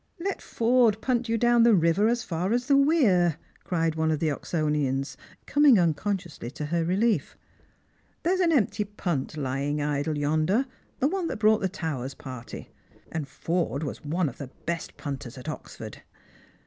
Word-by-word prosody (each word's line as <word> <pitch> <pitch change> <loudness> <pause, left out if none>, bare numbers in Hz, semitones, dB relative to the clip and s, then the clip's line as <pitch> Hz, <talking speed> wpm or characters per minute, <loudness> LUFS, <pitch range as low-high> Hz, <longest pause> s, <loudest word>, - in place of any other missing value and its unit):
" - - -37
Let 395 - -4
Forde 230 -2 +2
punt 245 -1 0
you 230 - +2
down 240 +1 +4
the 230 -2 +6
river 170 +4 +3
as 240 0 +1
far 180 +5 -1
as 245 +1 0
the 280 - +4
weir," 225 - +4 0.3
cried 165 -3 0
one 160 0 0
of 155 - +1
the 155 0 0
Oxonians, 145 -3 -1 0.3
coming 290 -5 +5
unconsciously 175 - -1
to 150 +3 -6
her 170 -1 +2
relief. 190 - +1 0.4
" - - -39
There's 370 +3 +2
an 350 -3 +3
empty 220 -7 +2
punt 175 -8 -3
lying 140 +1 -1
idle 145 +1 -1
yonder, 155 - +1 0.3
the 275 - +2
one 365 +1 -1
that - - -3
brought 215 0 +4
the 190 - 0
Towers 145 -8 -4
party; 130 -3 -9 0.4
and 160 -4 -3
Forde 160 +1 -2
was 145 - -5
one 160 +3 0
of 130 - -7
the 140 - -5 0.2
best 170 -1 -4
punters 135 -4 -6
at 125 - -10
Oxford." - - -7
170 Hz, 175 wpm, -27 LUFS, 150-230 Hz, 0.4 s, the